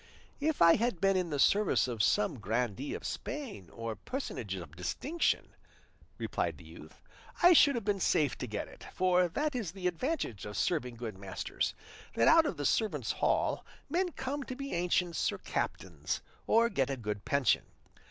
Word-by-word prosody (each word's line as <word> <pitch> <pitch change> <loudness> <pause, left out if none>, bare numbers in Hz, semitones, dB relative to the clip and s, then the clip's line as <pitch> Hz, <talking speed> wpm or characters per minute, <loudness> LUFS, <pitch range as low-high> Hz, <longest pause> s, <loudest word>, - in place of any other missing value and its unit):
"If 300 - +2
I 170 0 +7
had 230 -5 0
been 195 +1 +3
in 180 -2 0
the 145 - -2
service 200 +1 +3
of 115 -4 -2
some 105 +4 +2
grandee 115 +5 -2
of - - -7
Spain 260 - -5
or 115 -1 -5
personage 115 - -4
of 85 -4 -9
distinction," 290 - -1 0.6
replied - - -2
the - - -14
youth, - - -13 0.4
"I 355 +1 +9
should 285 -4 +6
have 235 - -3
been 205 -2 +1
safe 145 -8 +2
to 125 - -3
get 105 -2 -4
it; - - -14
for 180 -1 +3
that 295 - -1
is 215 -10 -3
the 190 -2 -8
advantage 180 - -1
of 105 -1 -6
serving 125 - 0
good 115 -5 -6
masters, 95 -1 -3 0.4
that 115 - +4
out 325 -2 +7
of - - -3
the 145 - -3
servants' 150 - +1
hall - - +1 0.3
men 360 +2 +1
come 270 +2 -3
to 255 - -5
be 275 +1 -5
ancients 175 0 +1
or - - -5
captains, - - -3 0.2
or 230 +1 +5
get 135 - 0
a 135 - -2
good 105 -3 -4
pension. 140 -4 +2
170 Hz, 180 wpm, -32 LUFS, -, 0.6 s, I